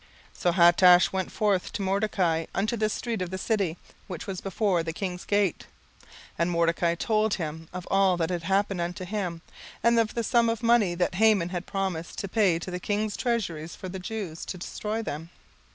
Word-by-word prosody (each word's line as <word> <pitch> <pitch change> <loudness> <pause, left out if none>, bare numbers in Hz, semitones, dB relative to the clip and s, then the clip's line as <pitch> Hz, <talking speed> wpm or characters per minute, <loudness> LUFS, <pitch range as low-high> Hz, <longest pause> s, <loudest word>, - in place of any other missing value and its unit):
17:004:006 - - -19
So 175 - +3
Hatach 175 0 +6
went 190 -1 -2
forth 200 -4 0
to - - -3
Mordecai 190 -4 +1
unto 215 +5 0
the 215 -1 0
street 230 -1 -3
of 180 - -2
the 190 - -4
city, 190 -5 0 0.3
which 175 -4 -6
was 190 -2 -5
before 195 -2 0
the 165 0 -4
king's 180 0 -4
gate. 205 -4 0 0.3
17:004:007 - - -24 0.3
And 170 +1 +2
Mordecai 170 0 +1
told 215 +3 +1
him 160 -1 -5
of 180 0 -7
all 195 -2 +4
that 165 +1 -1
had 175 -1 -2
happened 195 +1 0
unto 180 +2 -4
him, 180 -4 -3 0.4
and 235 0 +4
of 225 -1 0
the 235 - 0
sum 235 +1 +3
of 230 0 -2
the - - -3
money 225 -7 +4
that 175 +1 0
Haman 200 -3 +3
had 180 0 -5
promised 190 -4 -3
to 200 - -3
pay 195 -4 +2
to 175 +2 -6
the 180 - -3
king's 210 +2 -1
treasuries 170 -10 -2
for 185 - -7
the 190 +1 -6
Jews, 185 -5 -5
to 185 - -5
destroy 215 +5 -4
them. 160 -3 -5
185 Hz, 205 wpm, -27 LUFS, 175-210 Hz, 0.4 s, Hatach